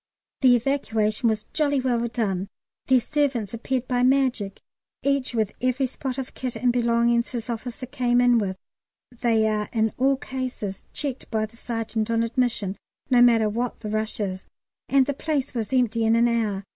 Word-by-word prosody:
The 255 Hz, -2 st, +7 dB
evacuation 230 Hz, -3 st, +1 dB
was 215 Hz, -1 st, -2 dB
jolly 285 Hz, -3 st, +2 dB
well 240 Hz, -2 st, 0 dB
done; 200 Hz, -5 st, -1 dB, 0.4 s
their 260 Hz, -1 st, +5 dB
servants 260 Hz, -6 st, -1 dB
appeared 250 Hz, +2 st, -2 dB
by 245 Hz, -1 st, +1 dB
magic, 255 Hz, -6 st, +2 dB, 0.4 s
each 275 Hz, -3 st, 0 dB
with 215 Hz, -3 st, +1 dB
every 255 Hz, +2 st, +1 dB
spot 260 Hz, 0 st, -5 dB
of 265 Hz, -2 st, -5 dB
kit 255 Hz, -2 st, -4 dB
and 245 Hz, -1 st, +1 dB
belongings 235 Hz, 0 st, +2 dB
his 240 Hz, -1 st, -4 dB
officer 240 Hz, +2 st, -5 dB
came 245 Hz, -2 st, +1 dB
in 245 Hz, -1 st, +5 dB
with 190 Hz, -3 st, -2 dB, 0.5 s
(they 230 Hz, -2 st, +2 dB
are 210 Hz, -1 st, -1 dB
in 220 Hz, -1 st, +1 dB
all 270 Hz, +1 st, +3 dB
cases 255 Hz, -7 st, -5 dB
checked 275 Hz, -3 st, -4 dB
by 220 Hz, -1 st, 0 dB
the 215 Hz, +2 st, -16 dB
Sergeant 225 Hz, -1 st, -3 dB
on 230 Hz, 0 st, +2 dB
admission, 230 Hz, -4 st, -1 dB, 0.3 s
no 245 Hz, -1 st, +6 dB
matter 230 Hz, -3 st, +5 dB
what 235 Hz, +3 st, -3 dB
the 210 Hz, -2 st, -4 dB
rush 215 Hz, +1 st, -2 dB
is), 190 Hz, -2 st, -3 dB, 0.4 s
and 270 Hz, -1 st, +5 dB
the 285 Hz, -, -1 dB
place 285 Hz, -1 st, -2 dB
was 230 Hz, -2 st, -3 dB
empty 240 Hz, -3 st, +2 dB
in 225 Hz, +1 st, +4 dB
an 235 Hz, +1 st, +4 dB
hour. 215 Hz, -4 st, 0 dB
235 Hz, 175 wpm, -24 LUFS, 220-255 Hz, 0.5 s, The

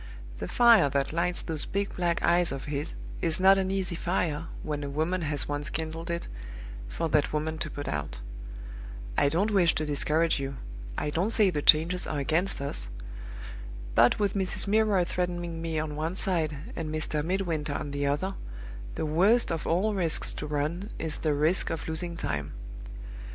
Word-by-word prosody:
The -, -, -3 dB
fire 230 Hz, -11 st, +6 dB
that 140 Hz, +1 st, 0 dB
lights 175 Hz, +1 st, +1 dB
those 160 Hz, -3 st, -1 dB
big 200 Hz, 0 st, -2 dB
black 170 Hz, -2 st, 0 dB
eyes 175 Hz, 0 st, +4 dB
of 135 Hz, -1 st, -5 dB
his 145 Hz, 0 st, -3 dB, 0.3 s
is 165 Hz, 0 st, +1 dB
not 195 Hz, +1 st, +6 dB
an 190 Hz, -1 st, 0 dB
easy 190 Hz, -2 st, -1 dB
fire, 170 Hz, -2 st, -1 dB, 0.2 s
when 150 Hz, -1 st, -3 dB
a 140 Hz, -, -3 dB
woman 160 Hz, +6 st, 0 dB
has 145 Hz, -3 st, +1 dB
once 145 Hz, 0 st, -3 dB
kindled 165 Hz, +1 st, -3 dB
it, 170 Hz, 0 st, -2 dB, 0.6 s
for 165 Hz, -, -2 dB
that 150 Hz, -1 st, +2 dB
woman 155 Hz, +1 st, -2 dB
to 155 Hz, -, -2 dB
put 145 Hz, 0 st, -6 dB
out. 75 Hz, -4 st, -3 dB, 1.0 s
I 140 Hz, -, +4 dB
don't 190 Hz, +8 st, +1 dB
wish 180 Hz, -5 st, +4 dB
to 155 Hz, -, 0 dB
discourage 150 Hz, +2 st, +1 dB
you; 135 Hz, 0 st, -3 dB, 0.4 s
I 150 Hz, -, -1 dB
don't 175 Hz, +8 st, +1 dB
say 210 Hz, -4 st, +4 dB
the 150 Hz, -, -1 dB
changes 165 Hz, +5 st, +5 dB
are 150 Hz, -, -2 dB
against 160 Hz, +7 st, +1 dB
us. -, -, -4 dB, 1.0 s
But 120 Hz, -, +5 dB
with 205 Hz, -2 st, +1 dB
Mrs. 190 Hz, -2 st, 0 dB
Milroy 210 Hz, -3 st, +3 dB
threatening 175 Hz, -2 st, -2 dB
me 165 Hz, -1 st, -2 dB
on 155 Hz, -1 st, -2 dB
one 160 Hz, +4 st, -2 dB
side, 165 Hz, -6 st, 0 dB, 0.2 s
and 160 Hz, -2 st, -3 dB
Mr. 155 Hz, -1 st, -1 dB
Midwinter 165 Hz, -4 st, -1 dB
on 145 Hz, -, -4 dB
the 140 Hz, 0 st, -1 dB
other, 150 Hz, +8 st, 0 dB, 0.6 s
the -, -, -2 dB
worst 190 Hz, +11 st, +3 dB
of 165 Hz, -2 st, -2 dB
all 195 Hz, +6 st, +2 dB
risks 175 Hz, -5 st, 0 dB
to 150 Hz, -, -5 dB
run 155 Hz, +7 st, -2 dB
is 155 Hz, -1 st, -3 dB
the 155 Hz, -2 st, +1 dB
risk 155 Hz, +6 st, +2 dB
of 165 Hz, -, -4 dB
losing 170 Hz, +2 st, -2 dB
time. 75 Hz, -, -3 dB
160 Hz, 180 wpm, -28 LUFS, 150-180 Hz, 1.0 s, fire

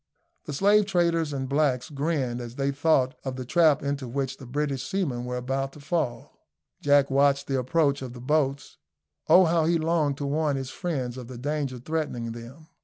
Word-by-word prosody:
The 150 Hz, -, -5 dB
slave 205 Hz, +6 st, +4 dB
traders 170 Hz, -4 st, +1 dB
and 135 Hz, -2 st, -3 dB
blacks 140 Hz, -2 st, 0 dB
grinned 140 Hz, -4 st, -1 dB
as 120 Hz, 0 st, -8 dB
they 140 Hz, 0 st, 0 dB
thought 140 Hz, -2 st, +2 dB
of 130 Hz, -1 st, -4 dB
the 130 Hz, -1 st, -6 dB
trap 155 Hz, 0 st, +3 dB
into 140 Hz, -2 st, -2 dB
which 135 Hz, +2 st, -3 dB
the 130 Hz, -, -11 dB
British 135 Hz, -1 st, -2 dB
seamen 140 Hz, -11 st, -1 dB
were 125 Hz, 0 st, -3 dB
about 135 Hz, +2 st, -2 dB
to -, -, -13 dB
fall. 150 Hz, -4 st, -3 dB, 0.4 s
Jack 145 Hz, -1 st, +4 dB
watched 140 Hz, 0 st, +3 dB
the 135 Hz, -1 st, 0 dB
approach 140 Hz, +2 st, +1 dB
of 130 Hz, -2 st, -6 dB
the 125 Hz, -, -10 dB
boats. 140 Hz, +1 st, -1 dB, 0.5 s
Oh! 185 Hz, 0 st, +8 dB
how 165 Hz, -1 st, +2 dB
he 170 Hz, +1 st, +3 dB
longed 155 Hz, -3 st, +1 dB
to 145 Hz, -, -3 dB
warn 145 Hz, 0 st, 0 dB
his 135 Hz, -1 st, -5 dB
friends 135 Hz, -9 st, -3 dB
of 125 Hz, -, -9 dB
the 125 Hz, -1 st, -8 dB
danger 140 Hz, 0 st, -2 dB
threatening 125 Hz, -4 st, -3 dB
them. 120 Hz, +7 st, -10 dB
140 Hz, 190 wpm, -26 LUFS, 130-155 Hz, 0.5 s, Oh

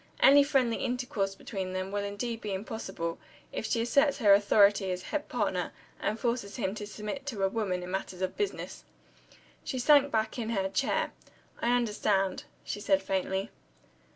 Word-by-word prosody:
Any 285 Hz, +1 st, +8 dB
friendly 260 Hz, -5 st, +2 dB
intercourse 245 Hz, -6 st, -2 dB
between 190 Hz, -2 st, -5 dB
them 185 Hz, +1 st, -3 dB
will 205 Hz, 0 st, -1 dB
indeed 225 Hz, +3 st, -4 dB
be 205 Hz, -2 st, -3 dB
impossible, 190 Hz, -5 st, -4 dB, 0.3 s
if 220 Hz, -, -3 dB
she 230 Hz, +1 st, +1 dB
asserts 280 Hz, +4 st, +3 dB
her 210 Hz, -6 st, +6 dB
authority 200 Hz, -1 st, +5 dB
as 180 Hz, 0 st, -3 dB
head 300 Hz, -1 st, -3 dB
partner, -, -, -1 dB, 0.3 s
and 215 Hz, -, -1 dB
forces 235 Hz, -4 st, -1 dB
him 195 Hz, -6 st, -1 dB
to 210 Hz, -1 st, -6 dB
submit 215 Hz, +7 st, -6 dB
to 215 Hz, -8 st, -2 dB
a -, -, +5 dB
woman 190 Hz, -4 st, -1 dB
in 180 Hz, -, -6 dB
a -, -, -6 dB
matter 190 Hz, -1 st, -3 dB
of 185 Hz, -, -8 dB
business." 410 Hz, -1 st, -3 dB, 0.8 s
She 260 Hz, -, -3 dB
sank 285 Hz, +2 st, +5 dB
back 220 Hz, +2 st, 0 dB
in 225 Hz, -1 st, -2 dB
her 195 Hz, -4 st, 0 dB
chair. 190 Hz, -, 0 dB, 0.5 s
"I 240 Hz, +1 st, +3 dB
understand." 210 Hz, -5 st, 0 dB, 0.2 s
she -, -, -4 dB
said 195 Hz, -2 st, +2 dB
faintly. 190 Hz, +1 st, -1 dB
210 Hz, 175 wpm, -30 LUFS, 195-240 Hz, 0.8 s, Any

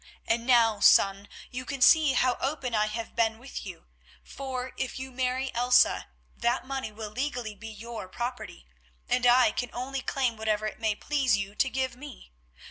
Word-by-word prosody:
And 230 Hz, +1 st, 0 dB
now, 230 Hz, -4 st, +4 dB
son, 195 Hz, +1 st, +4 dB, 0.2 s
you 255 Hz, +1 st, -5 dB
can 275 Hz, +1 st, -5 dB
see 300 Hz, +1 st, +6 dB
how 255 Hz, -1 st, +2 dB
open 270 Hz, -3 st, -2 dB
I 215 Hz, -1 st, +2 dB
have 225 Hz, +1 st, -6 dB
been 225 Hz, -1 st, +1 dB
with 245 Hz, -3 st, -8 dB
you, 180 Hz, -3 st, -10 dB, 0.4 s
for 260 Hz, -1 st, -5 dB
if 265 Hz, -2 st, -4 dB
you 260 Hz, 0 st, -7 dB
marry 255 Hz, +1 st, -2 dB
Elsa 245 Hz, +1 st, +3 dB, 0.3 s
that 240 Hz, +2 st, 0 dB
money 270 Hz, -3 st, -4 dB
will 215 Hz, 0 st, -7 dB
legally 245 Hz, -3 st, -3 dB
be 225 Hz, +2 st, -11 dB
your 225 Hz, -1 st, -8 dB
property, 240 Hz, -, -6 dB, 0.4 s
and 250 Hz, -1 st, +2 dB
I 245 Hz, -2 st, +6 dB
can 245 Hz, +2 st, -3 dB
only 265 Hz, +2 st, -4 dB
claim 250 Hz, -4 st, -1 dB
whatever 215 Hz, -1 st, -1 dB
it 215 Hz, -, -5 dB
may 220 Hz, -2 st, 0 dB
please 270 Hz, -4 st, +1 dB
you 200 Hz, 0 st, -4 dB
to 265 Hz, -, +1 dB
give 260 Hz, -1 st, -2 dB
me. 260 Hz, -, -12 dB
245 Hz, 180 wpm, -28 LUFS, 220-260 Hz, 0.4 s, see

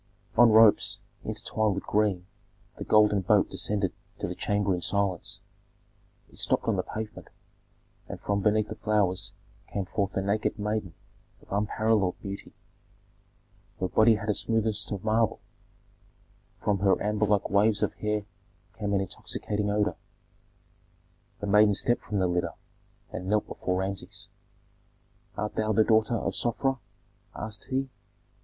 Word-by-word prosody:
On 120 Hz, 0 st, +7 dB
ropes, 110 Hz, -1 st, +6 dB, 0.2 s
entwined 110 Hz, -3 st, -1 dB
with 95 Hz, -, -4 dB
green, 100 Hz, -4 st, +1 dB, 0.5 s
the -, -, -5 dB
golden 105 Hz, -2 st, +4 dB
boat 90 Hz, -, +3 dB
descended 100 Hz, -3 st, 0 dB, 0.2 s
to -, -, -3 dB
the -, -, -3 dB
chamber 100 Hz, -1 st, 0 dB
in 90 Hz, -, -2 dB
silence. 100 Hz, -2 st, -1 dB, 0.9 s
It -, -, -5 dB
stopped -, -, +2 dB
on -, -, +2 dB
the -, -, +1 dB
pavement, 110 Hz, 0 st, -7 dB, 0.8 s
and -, -, -6 dB
from 100 Hz, 0 st, -1 dB
beneath 105 Hz, +1 st, +2 dB
the -, -, -5 dB
flowers 105 Hz, -4 st, 0 dB, 0.4 s
came 100 Hz, -2 st, -2 dB
forth 95 Hz, +1 st, -2 dB
a 95 Hz, -, 0 dB
naked 105 Hz, +3 st, 0 dB
maiden 105 Hz, -4 st, -2 dB, 0.5 s
of -, -, -20 dB
unparalleled 105 Hz, -1 st, +1 dB
beauty. 100 Hz, 0 st, -7 dB, 1.3 s
Her 95 Hz, -, 0 dB
body 110 Hz, +3 st, +5 dB
had 105 Hz, 0 st, -6 dB
the 105 Hz, -, +3 dB
smoothness 110 Hz, -1 st, 0 dB
of 100 Hz, -3 st, -4 dB
marble; 110 Hz, 0 st, +2 dB, 1.2 s
from 100 Hz, -2 st, +1 dB
her 95 Hz, 0 st, +3 dB
amber 105 Hz, 0 st, 0 dB
like 105 Hz, -1 st, +1 dB
waves 105 Hz, +1 st, +3 dB
of -, -, 0 dB
hair 105 Hz, -1 st, -2 dB, 0.5 s
came 100 Hz, -1 st, -1 dB
an 95 Hz, -, +2 dB
intoxicating 105 Hz, +2 st, -3 dB
odor. 105 Hz, +1 st, +1 dB, 1.5 s
The -, -, -2 dB
maiden 105 Hz, 0 st, +5 dB
stepped 120 Hz, +4 st, +1 dB
from 105 Hz, -, -3 dB
the 95 Hz, -, +2 dB
litter 90 Hz, 0 st, 0 dB, 0.6 s
and 90 Hz, -, -5 dB
knelt 105 Hz, +1 st, +2 dB
before 90 Hz, 0 st, -2 dB
Rameses. 95 Hz, +1 st, -4 dB, 1.1 s
"Art 105 Hz, 0 st, -2 dB
thou 110 Hz, 0 st, 0 dB
the 110 Hz, -, +5 dB
daughter 110 Hz, +1 st, +3 dB
of 95 Hz, -3 st, -1 dB
Sofra?" 130 Hz, +2 st, 0 dB, 0.6 s
asked 110 Hz, 0 st, -5 dB
he. 135 Hz, +1 st, -1 dB
105 Hz, 145 wpm, -28 LUFS, 100-110 Hz, 1.5 s, On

